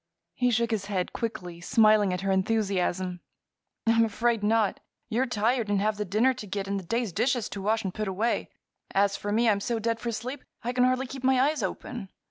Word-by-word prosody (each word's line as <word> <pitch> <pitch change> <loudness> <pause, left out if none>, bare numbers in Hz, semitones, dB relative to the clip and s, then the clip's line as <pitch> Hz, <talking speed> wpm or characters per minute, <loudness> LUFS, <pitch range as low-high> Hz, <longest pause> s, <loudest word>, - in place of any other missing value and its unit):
He 250 0 +1
shook 235 0 +1
his 210 -3 -1
head 190 -3 -2
quickly, 180 -7 -4
smiling 215 +1 +4
at 180 0 -2
her 195 0 0
enthusiasm. 190 -3 0 0.7
"I'm 230 0 +4
afraid 230 +1 +1
not. 215 0 +2 0.3
You're 245 +3 +1
tired, 230 0 +1
and 205 -1 +2
have 210 +1 0
the 210 - -2
dinner 220 +8 +3
to 230 -4 -8
get 195 0 -3
and 200 0 -1
the - - -8
day's 230 +1 -1
dishes 245 0 +1
to 200 - -6
wash 220 +3 +1
and 190 -2 -3
put 215 -1 -3
away. 210 +5 -1 0.5
As 200 0 +3
for 205 - -4
me, 230 +3 +3
I'm 205 -2 +3
so 230 +3 -1
dead 230 +1 -1
for 235 - -3
sleep 250 +5 -5 0.2
I 245 +2 -2
can 250 0 +4
hardly 255 +1 +1
keep 265 0 -8
my 260 0 +4
eyes 290 +1 +2
open. 200 +2 -5
215 Hz, 215 wpm, -27 LUFS, 200-240 Hz, 0.7 s, smiling